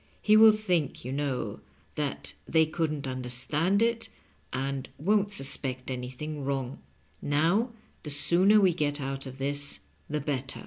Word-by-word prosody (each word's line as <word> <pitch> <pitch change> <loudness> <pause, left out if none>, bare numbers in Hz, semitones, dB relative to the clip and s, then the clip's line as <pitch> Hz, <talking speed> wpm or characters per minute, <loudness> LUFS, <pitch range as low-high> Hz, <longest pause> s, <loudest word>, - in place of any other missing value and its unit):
He 215 - +4
will 220 0 +9
think, 180 - -1
yon 130 +2 -3
know, 140 -4 -2 0.3
that 135 - -4
they 160 0 +4
couldn't 155 -2 -2
understand 130 - 0
it, 230 0 0 0.4
and 135 +1 -3
won't 205 +5 +1
suspect 135 -5 0
anything 130 +4 -5
wrong. 135 -1 -3 0.4
Now, 165 - +2 0.3
the 150 - -8
sooner 180 +8 +4
we 190 -3 +4
get 145 -2 -1
out 135 0 -4
of 130 0 -9
this 145 +1 -3 0.3
the 150 0 -1
better." 135 -2 -3
145 Hz, 140 wpm, -28 LUFS, 135-175 Hz, 0.4 s, will